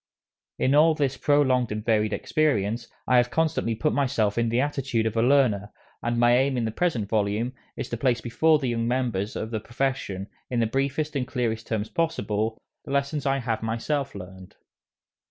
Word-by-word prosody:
In 130 - +2
all 155 +2 +5
this 140 -3 0
prolonged 130 -6 +2
and 105 +1 -4
varied 110 -2 +2
experience, 120 -6 0 0.2
I 125 - +4
have 120 0 +4
constantly 155 -7 0
put 150 +7 0
myself 115 -7 +1
in 115 -1 +1
the 120 +2 +1
attitude 135 -5 0
of 110 0 -1
a 115 - +3
learner, 120 -6 +3 0.3
and 120 0 -1
my 120 0 +5
aim 135 -1 +1
in 120 - 0
the 110 - -2
present 120 - 0
volume 105 +3 0 0.2
is - - -3
to 120 - -3
place 120 0 +1
before 155 +8 +3
the 135 -4 -2
younger 115 -1 -1
members 120 -4 -1
of 110 - -4
the 110 - -1
profession, 120 -5 -2 0.2
in 125 - 0
the 115 - +3
briefest 140 +5 -1
and 130 -3 -1
clearest 115 -4 -2
terms 110 -1 -1
possible, 110 -9 -1 0.2
the - - -12
lessons 140 +1 0
I 135 0 +2
have 115 -4 -2
myself 125 +4 -2
learned. 95 -1 -10
120 Hz, 190 wpm, -25 LUFS, 110-140 Hz, 0.3 s, all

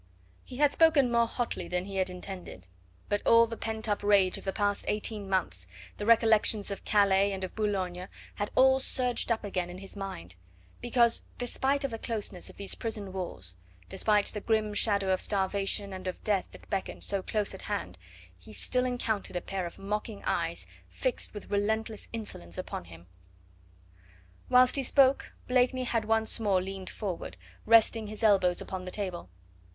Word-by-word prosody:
He 250 - -10
had 290 0 +4
spoken 310 -6 +4
more 235 -1 +3
hotly 230 -7 -3
than 180 +1 -2
he 195 -1 -6
had 185 0 +1
intended, 180 - -8 0.4
but 205 - 0
all 230 0 +6
the 230 0 -6
pent 220 0 -2
up 205 -1 0
rage 200 -3 +4
of - - -15
the 195 - 0
past 205 0 0
eighteen 210 -1 -2
months, 95 - -1 0.3
the 205 - -4
recollections 220 -2 +4
of 200 - -5
Calais 200 -1 +3
and 190 -1 -4
of 185 - -5
Boulogne, 185 -4 -2 0.3
had 205 - -3
all 265 0 +6
surged 250 -2 0
up 225 - 0
again 185 -3 -2
in 175 - -8
his 195 +2 -10
mind, 140 - -7 0.5
because 240 -1 +3
despite 265 +3 0
the 250 -6 -3
closeness 210 -6 -2
of - - -14
these 200 - +1
prison 210 -4 -5
walls, 95 - -5 0.3
despite 210 - +2
the 210 - -4
grim 215 -1 0
shadow 200 -3 +2
of 185 - 0
starvation 200 0 0
and 185 0 -7
of 185 - -5
death 200 -3 +1
that - - -15
beckoned 195 -3 -4
so 200 -1 -1
close 210 +1 -1
at 190 - -9
hand, 205 -1 -4 0.4
he 90 - -14
still 105 - +1
encountered 225 -6 -2
a - - +1
pair 190 -1 -3
of 170 - -11
mocking 210 +1 -4
eyes, - - -1 0.2
fixed - - -2
with 210 - -9
relentless 215 +2 -1
insolence 145 - -5
upon - - -5
him. 85 0 -13 1.4
Whilst 255 +1 +6
he - - +1
spoke 270 +1 +3
Blakeney 255 0 +2
had 230 -3 -1
once 220 +1 +3
more 200 -4 +2
leaned 190 0 -6
forward, 190 -6 -5 0.3
resting 225 -1 +5
his 215 +2 -5
elbows 190 -4 +4
upon 185 -1 -6
the - - -5
table. 185 - -4
205 Hz, 175 wpm, -29 LUFS, 190-230 Hz, 1.4 s, all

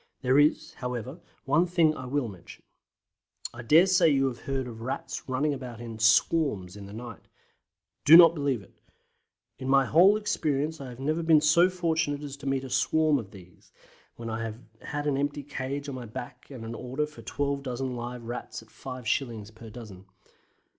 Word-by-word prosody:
There 130 +2 +4
is, 150 +1 +2
however, 125 - -5 0.3
one 150 +6 +3
thing 170 -3 +3
I 130 - -7
will 140 -1 -1
mention. 95 -5 -12 0.9
I 120 - -8
dare 155 +10 +6
say 180 -3 +4
you 135 -2 +3
have 120 - -9
heard 135 -1 -3
of 115 -2 -9
Rats 130 +2 -5
running 140 +3 +1
about 125 -4 -7
in 115 -2 -8
"swarms" 110 - +2
in 100 -1 -9
the - - -11
night. 115 0 -9 0.8
Do 160 +3 +10
not 170 -2 +9
believe 140 - -1
it. - - -21 0.9
In 130 - -4
my 135 0 +5
whole 180 - +5
experience 155 -7 -1
I 135 - -7
have 125 0 -11
never 155 +5 -1
been 160 -2 +5
so 165 +4 +5
fortunate 165 -5 -1
as 140 -1 -6
to 140 - -8
meet 135 -1 0
a 135 - -7
"swarm" 155 0 +2
of 105 -5 -8
these, 90 -3 -16 0.4
when 115 - -8
I 110 0 -3
have 115 -1 -5 0.2
had 145 0 -4
an 145 -2 +1
empty 145 +1 -2
cage 140 +1 -5
on 140 - -5
my 125 -2 -6
back, 125 +2 -9
and 125 -5 -8
an 115 - -6
order 130 +5 -3
for 150 0 -13
12 140 -1 -2
dozen 130 -1 -4
live 120 0 -6
Rats 120 -1 -6
at 110 - -22
5s. 120 -4 -4
per 110 +1 -12
dozen. 105 -5 -11
135 Hz, 190 wpm, -27 LUFS, 120-150 Hz, 0.9 s, Do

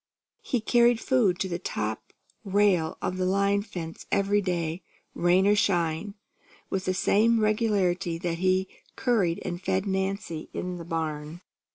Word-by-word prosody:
He 245 - -1
carried 240 +1 +4
food 225 -8 +2
to 190 - 0
the 175 -1 -3
top 110 - -4 0.3
rail 195 -5 +2
of 185 - -2
the 185 - 0
line 200 +2 +2
fence 175 -6 -8
every 200 0 +2
day, 175 -2 -2 0.3
rain 180 +2 +3
or 205 - +5
shine, 175 0 0 0.6
with 190 0 -1
the 185 - +1
same 225 +4 +3
regularity 200 -5 +1
that 170 -1 -3
he 185 +1 +2 0.3
curried 205 -10 +1
and 175 0 -4
fed 190 +1 0
Nancy 190 -4 -3
in 180 0 -4
the 170 - -8
barn. 160 0 -4
190 Hz, 150 wpm, -27 LUFS, 170-205 Hz, 0.6 s, or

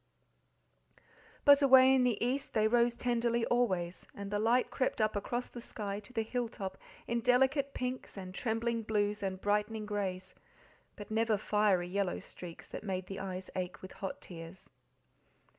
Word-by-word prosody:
But 285 0 +8
away 265 -1 +8
in 260 -1 +4
the 245 -4 +2
east 270 +2 -2
they 215 -1 +4
rose 235 +1 +3
tenderly 235 -1 +1
always, 185 -8 0
and 200 0 -6
the 205 - 0
light 235 +4 +2
crept 260 - 0
up 215 -1 +2
across 240 +4 -2
the 240 - -9
sky 205 -3 -4
to 210 - -13
the 225 -3 -1
hill 240 +1 -2
top 195 -3 -6 0.3
in 235 0 0
delicate 265 +3 +3
pinks 250 -3 -4
and 185 -1 -7
trembling 230 +2 -1
blues 210 -1 0
and 190 -1 -2
brightening 210 +2 0
greys, 190 -3 -3 0.6
but 205 +1 -10
never 220 -1 +2
fiery, 205 -3 +2
yellow 190 0 -1
streaks, 170 -2 -9
that - - -7
made 190 -3 -3
the 195 +1 -6
eyes 190 -1 -5
ache 180 0 -4
with 185 - -8
hot 195 - -6
tears. 170 +1 -10
215 Hz, 165 wpm, -33 LUFS, 195-240 Hz, 0.6 s, But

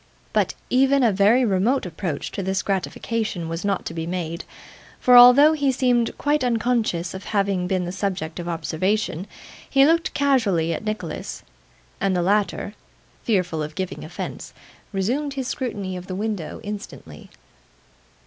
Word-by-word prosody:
But, - - +1 0.2
even 270 +1 +4
a 230 - +4
very 210 +6 +4
remote 215 +6 +1
approach 165 -3 -4
to - - -4
this 190 0 -1
gratification 200 -1 -2
was 165 +1 -4
not 200 -1 -1
to - - -5
be 165 0 -4
made, 170 -1 -4 0.5
for 250 -1 +5
although 250 +5 +9
he 285 -3 +1
seemed 245 -3 +1
quite 295 -1 +1
unconscious 230 -7 0
of 190 - -8
having 195 -3 0
been 185 -1 0
the 175 - -4
subject 185 -4 -3
of 175 0 -4
observation, 170 +4 -1 0.4
he 275 0 +5
looked 330 +2 +2
casually 210 - +2
at 160 - -5
Nicholas; 215 0 -5 0.6
and 195 -2 +1
the 175 - +1
latter, 205 +1 0 0.5
fearful 180 -7 0
of 155 +1 -5
giving 185 -1 -4
offence, - - -7 0.4
resumed 255 +9 -1
his 265 -2 -3
scrutiny 205 -9 -3
of 180 0 -8
the 185 - -4
window 205 -4 -3
instantly. 200 - -8
200 Hz, 150 wpm, -23 LUFS, 180-245 Hz, 0.6 s, although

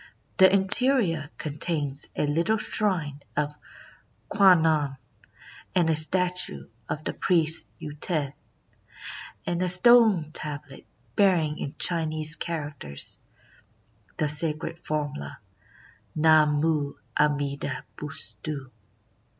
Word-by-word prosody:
The 190 0 +6
interior 195 - +2
contains 145 -2 -3
a - - 0
little 170 +9 0
shrine 170 -10 -1 0.2
of 150 0 -1 0.8
Kwan 185 -5 +5
non, 150 -4 0 0.8
and 170 -3 +2
a - - +1
statue 175 - +2 0.2
of 155 - -4
the - - -4
priest 165 -3 +1
Yuten, 150 -1 -3 1.1
and 175 0 -2
a 185 - +1
stone 200 -4 +5
tablet 145 -3 -6 0.3
bearing 170 -7 +2
in 140 - -6
Chinese 155 -2 +1
characters 145 - -4 1.0
the 155 - 0
sacred 155 +2 +4
formula, 145 - -5 0.8
Namu 155 -1 +2 0.2
Amida 140 -2 -1
Butsu. 140 0 -6
155 Hz, 95 wpm, -25 LUFS, 145-175 Hz, 1.1 s, The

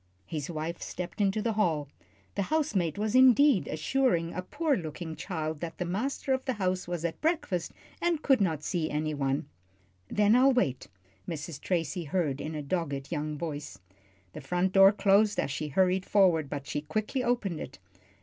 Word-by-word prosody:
His 150 -2 -4
wife 165 +1 -4
stepped 180 +3 -5
into 205 +1 +1
the 230 -1 0
hall. 165 -9 +1 0.5
The - - -1
housemaid 210 - 0
was 210 0 -1
indeed 260 -2 +6
assuring 170 - 0
a 185 - -3
poor 290 - 0
looking 160 - -5
child 160 -2 -4
that 165 0 -6
the 180 - -2
master 255 +9 -1
of 260 0 -1
the 260 - 0
house 185 -4 -1
was 175 -1 -3
at 165 - -3
breakfast 290 - 0 0.3
and 340 -3 0
could 270 -6 +4
not 160 -6 0
see 165 -2 -1
any 155 +1 -1
one. 135 -1 -1 0.6
"Then 210 - +3
I'll 265 +2 +5
wait," 135 - 0 0.4
Mrs. 155 -2 -5
Tracy 170 -1 -1
heard 150 -3 -1
in 155 +1 -5
a 150 - -4
dogged 140 -3 -3
young 150 -2 -2
voice. 150 -8 -5 0.6
The 155 - -7
front 180 +6 0
door 195 0 +8
closed 205 0 +3
as - - 0
she 150 +2 -3
hurried 185 +5 +1
forward, 175 -8 +3
but 140 -1 -5
she 145 - -3
quickly 215 - -2
opened 215 -9 0
it. 125 - -8
180 Hz, 180 wpm, -29 LUFS, 155-215 Hz, 0.6 s, door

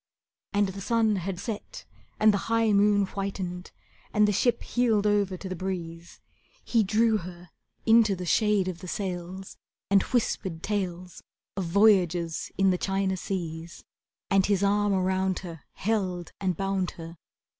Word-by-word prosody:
And 205 -1 +2
the 195 +1 -7
sun 220 -1 +2
had 185 0 -4
set 210 +1 -6 0.3
and 215 0 +5
the 200 - -3
high 225 -1 +3
moon 205 0 +4
whitened, 190 -2 -5 0.4
And 210 0 +4
the - - +2
ship 240 +4 +1
heeled 225 -4 +1
over 205 -3 +1
to 190 - -7
the 185 - -4
breeze. 170 -2 -6 0.5
He 230 - +3
drew 220 +2 +3
her 175 -2 -10 0.3
into 225 -3 +5
the 180 0 -6
shade 210 +1 +2
of 180 -2 -4
the 185 - -9
sails, 185 0 -5 0.3
And 200 -1 +6
whispered 190 -8 -2
tales 185 -4 -3 0.3
Of 190 -1 -2
voyages 175 -3 +2
in 195 0 +4
the 180 - -1
China 195 -1 0
seas, 170 -3 -5 0.5
And 195 -1 +5
his 200 -1 +1
arm 205 +1 +2
around 190 0 +1
her 165 -3 -8
Held 185 -5 -2
and 185 -4 0
bound 195 -2 -1
her. 165 0 -9
195 Hz, 155 wpm, -27 LUFS, 180-205 Hz, 0.5 s, And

